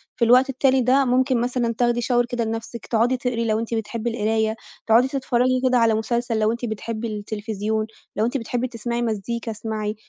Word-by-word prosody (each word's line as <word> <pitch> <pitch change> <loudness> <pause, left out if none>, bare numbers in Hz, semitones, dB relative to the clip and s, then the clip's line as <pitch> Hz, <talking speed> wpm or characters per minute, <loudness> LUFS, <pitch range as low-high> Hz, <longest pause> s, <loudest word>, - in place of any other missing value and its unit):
في 235 - +2
الوقت 255 +3 +5
التالي 265 0 +2
ده 265 +3 +3
ممكن 255 0 +2
مثلًا 240 -1 0
تاخدي 240 -1 +2
shower 240 0 +2
كده 245 -2 -1
لنَفْسِك، 225 +1 -5
تقعدي 240 +3 +2
تقري 245 -2 -1
لو 215 -1 +1
أنتِ 230 +1 -4
بتحبّي 225 +1 -2
القراية، 220 -1 0 0.3
تقعدي 230 +3 +5
تتفرجي 255 -1 +1
كده 255 -1 +3
على 230 -2 +4
مسلسل 230 +1 -1
لو 215 0 +2
أنتِ 235 +1 -3
بتحبّي 225 +1 -4
التليفزيون، 215 0 -3 0.3
لو 215 - +1
أنتِ 245 +4 -1
بتحبّي 245 +1 -2
تسمعي 235 0 -3
مزيكا 230 +1 -2
اسمعي، 215 -1 -4
235 Hz, 185 wpm, -23 LUFS, 220-245 Hz, 0.3 s, الوقت